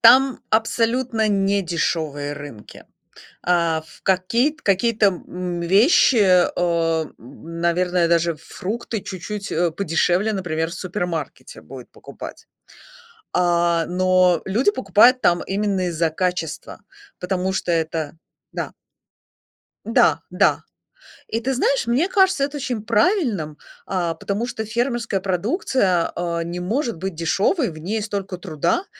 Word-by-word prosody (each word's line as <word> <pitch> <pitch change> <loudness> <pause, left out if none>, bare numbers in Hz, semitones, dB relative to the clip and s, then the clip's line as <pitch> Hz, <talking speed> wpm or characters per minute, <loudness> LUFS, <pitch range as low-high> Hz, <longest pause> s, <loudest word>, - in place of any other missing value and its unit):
там 260 +3 +6
абсолютно 230 +1 +1
не 200 0 +2
дешёвые 155 -4 -2
рынки. 140 -7 -10 0.6
А, 170 -2 +2
ф 160 - -18
какие 195 +9 +2
т 310 - -23
какие-то, 210 +2 +2
м, 180 -2 -3
вещи, 205 - +4
э, 175 -4 +2
наверное, 170 +6 -1
даже 170 -1 +2
фрукты 210 +8 -5
чуть-чуть, 200 +2 -6
э, 170 +1 +1
подешевле, 180 +4 +1
например, 165 -4 -2
в - - -7
супермаркете 175 -3 -5
будет - - -11
покупать. - - -10 0.9
А, 170 -1 +2
но 185 0 +3
люди 225 - +2
покупают 255 - +4
там 175 0 +3
именно 195 -2 0
из-за 165 -1 0
качества, 180 -1 -3 0.4
потому 185 +1 -1
что 180 - -1
это 160 -2 -2 0.3
Да. - - -4 1.1
Да, - - +3
да. - - +2 0.6
И 225 - -1
ты 265 +3 -1
знаешь, 270 +1 +1
мне 255 +10 +2
кажется 380 -7 +3
это 285 +1 -4
очень 245 -5 -3
правильным, 215 - +1 0.3
а, 175 -3 -1
потому 200 +7 -3
что 240 -3 -4
фермерская 235 -2 -1
продукция, 190 - 0
а, 170 -1 -2
не 175 +1 -5
может 230 - -1
быть 190 +1 -4
дешёвой. 200 - +1
В 155 - -10
ней 210 +7 -3
столько 200 -3 -4
труда. 180 - -1
185 Hz, 125 wpm, -21 LUFS, 170-225 Hz, 1.1 s, там